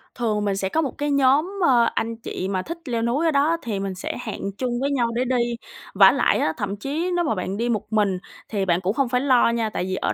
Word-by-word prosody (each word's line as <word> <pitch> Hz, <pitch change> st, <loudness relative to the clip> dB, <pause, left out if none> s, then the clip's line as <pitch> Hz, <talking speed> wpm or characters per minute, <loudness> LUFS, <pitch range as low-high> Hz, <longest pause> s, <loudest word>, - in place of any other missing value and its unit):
Thường 215 Hz, -4 st, -1 dB
mình 200 Hz, -1 st, 0 dB
sẽ 190 Hz, -1 st, -1 dB
có 320 Hz, -, +1 dB
một 275 Hz, -, -4 dB
cái 290 Hz, 0 st, -1 dB
nhóm, 285 Hz, +8 st, +2 dB
ơ, 240 Hz, -3 st, +4 dB
anh 230 Hz, 0 st, -1 dB
chị 205 Hz, -4 st, -5 dB
mà 190 Hz, -1 st, -1 dB
thích 335 Hz, -, -6 dB
leo 235 Hz, -3 st, -1 dB
núi 245 Hz, +8 st, 0 dB
ở 325 Hz, -, +3 dB
đó, 300 Hz, +4 st, +2 dB
thì 210 Hz, -5 st, -3 dB
mình 195 Hz, -1 st, -3 dB
sẽ 180 Hz, -, -5 dB
hẹn 200 Hz, -3 st, -5 dB
chung 245 Hz, -2 st, -2 dB
với 280 Hz, +1 st, 0 dB
nhau 245 Hz, -4 st, +1 dB
để 250 Hz, -, +1 dB
đi. 235 Hz, 0 st, 0 dB, 0.4 s
Vả -, -, +7 dB
lại -, -, +2 dB
á 160 Hz, -, +1 dB
thậm 200 Hz, -1 st, -3 dB
chí 310 Hz, -, -2 dB
nếu 345 Hz, -, +1 dB
mà 225 Hz, -, 0 dB
bạn 185 Hz, +2 st, -3 dB
đi 240 Hz, +1 st, -1 dB
một 215 Hz, -1 st, -2 dB
mình 200 Hz, -4 st, +2 dB, 0.3 s
thì 200 Hz, -3 st, -1 dB
bạn 175 Hz, 0 st, +1 dB
cũng 190 Hz, +3 st, 0 dB
không 270 Hz, -2 st, 0 dB
phải 250 Hz, 0 st, +1 dB
lo 255 Hz, -4 st, +4 dB
nha, 230 Hz, -2 st, 0 dB
tại 180 Hz, -, -3 dB
vì 185 Hz, 0 st, -2 dB
ở -, -, -1 dB
235 Hz, 270 wpm, -23 LUFS, 200-275 Hz, 0.4 s, Vả